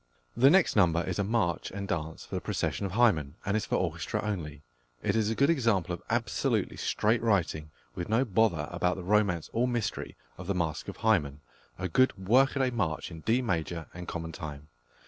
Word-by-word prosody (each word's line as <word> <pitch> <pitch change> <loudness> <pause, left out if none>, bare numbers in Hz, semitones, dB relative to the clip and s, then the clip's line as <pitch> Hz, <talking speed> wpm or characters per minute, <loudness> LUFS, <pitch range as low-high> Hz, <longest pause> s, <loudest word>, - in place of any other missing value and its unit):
The 130 +3 +6
next 185 +2 +4
number 85 -4 +4
is 90 +1 -3
a - - +2
march 100 -5 0
and 100 0 -5
dance 80 -2 -4
for - - -13
the - - -1
procession 100 - -2
of 95 - -8
Hymen, 85 - +3
and 100 +1 0
is 110 - -1
for - - 0
orchestra - - -1
only. 80 -9 -4 0.4
It 100 - +1
is 110 -1 +2
a 115 - -1
good 140 +6 +4
example 115 - +1
of 85 - -6
absolutely - - 0
straight 110 +3 +1
writing, 85 -8 0 0.2
with 85 +2 -5
no 115 +5 +3
bother 95 - +1
about 90 +1 0
the 95 - -7
romance 95 -4 +1
or 120 +2 +2
mystery 120 -3 -3 0.2
of 90 - -8
the 100 - 0
masque 80 -4 -2
of - - -7
Hymen 70 0 +1 0.4
a 90 - -2
good 130 +6 +3
workaday 130 +6 +3
march 100 -9 -2
in 80 - -8
D 115 +10 +1
major 85 -5 -2
and 90 0 -8
common 80 -1 -4
time. 75 -1 -8
95 Hz, 200 wpm, -29 LUFS, 85-115 Hz, 0.4 s, The